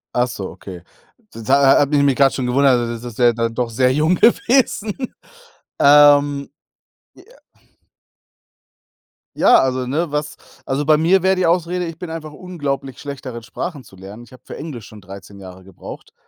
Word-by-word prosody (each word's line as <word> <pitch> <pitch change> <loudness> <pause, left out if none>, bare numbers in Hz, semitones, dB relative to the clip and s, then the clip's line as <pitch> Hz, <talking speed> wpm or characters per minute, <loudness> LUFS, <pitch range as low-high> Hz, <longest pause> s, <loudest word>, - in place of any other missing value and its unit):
Ach 125 +1 +2
so, 100 -6 -7
okay. 90 -3 -11 0.5
Das 115 -1 -11
ha 135 - +6 0.2
ha - - +4
habe 145 +1 +1
ich 140 - +3
mich 140 -2 +2
grad 135 0 +3
schon 130 - -3
gewundert, 130 0 +3
also, 120 0 -3
das 115 - -9
ist 120 0 -9
ja 120 -1 +5
dann 115 0 -2
doch 120 -1 -2
sehr 125 +3 +1
jung 155 +5 +2
gewesen. 230 -1 +2 0.9
Ähm 145 -1 +5 0.7
ja. - - -18 2.1
Ja, - - +5
also, 130 -1 -1
ne, 155 +4 -2
was 150 0 -3 0.3
also, 135 +2 -2
bei 155 0 +4
mir 175 +4 +2
wäre 190 0 +3
die 185 - +1
Ausrede, 175 +1 0
ich 165 -1 -8
bin 175 0 -8
einfach 160 -2 -8
unglaublich 145 -7 -5
schlecht 140 -1 -8
darin, 120 -3 -7
Sprachen 145 +3 -7
zu - - -17
lernen. 100 +5 -12
Ich 120 - -18
habe 130 0 -17
für - - -9
Englisch 140 -8 -8
schon 110 - -14
13 100 0 -13
Jahre 95 -1 -12
gebraucht. 95 +1 -12
140 Hz, 185 wpm, -19 LUFS, 120-155 Hz, 2.1 s, ha